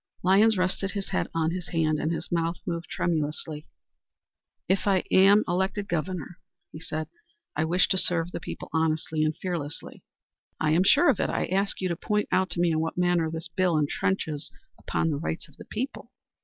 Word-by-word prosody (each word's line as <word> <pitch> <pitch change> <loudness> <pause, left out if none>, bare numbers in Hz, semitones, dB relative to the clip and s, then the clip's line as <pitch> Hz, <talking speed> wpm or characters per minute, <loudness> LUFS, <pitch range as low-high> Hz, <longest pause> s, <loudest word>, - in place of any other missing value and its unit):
Lyons 200 +4 +5
rested 185 +1 0
his 200 -2 -4
head 190 - 0
on 160 0 +1
his 180 -1 -4
hand 155 -2 +1
and 155 +2 0
his 165 - -4
mouth 170 0 0
moved 170 0 -3
tremulously. 155 -2 -2 1.0
"If 190 +2 +1
I 190 -2 +3
am 200 +3 +6
elected 190 +3 -1
governor," 175 0 -3 0.3
he 155 - -9
said, 155 -1 -4 0.5
"I 155 +2 +1
wish 180 +3 +3
to 190 - +3
serve 175 -1 +1
the - - -4
people - - -8
honestly 160 -1 +1
and 155 0 0
fearlessly." 165 -6 -5 0.6
"I 155 - +2
am 170 +4 +4
sure 290 - +6
of - - -4
it. - - +1
I - - 0
ask 195 +2 0
you 185 - +1
to 170 - -1
point 210 +5 -1
out 185 0 +2
to 170 - -2
me 175 -1 +3
in 155 - +1
what 160 +2 -2
manner 175 -2 +2
this 160 0 -5
bill 180 -4 +2
trenches 155 -4 -2 0.3
upon 165 - -1
the 145 - -1
rights 160 0 -4
of 150 - -22
the - - -11
people. 255 +6 -5
170 Hz, 195 wpm, -27 LUFS, 160-190 Hz, 1.0 s, am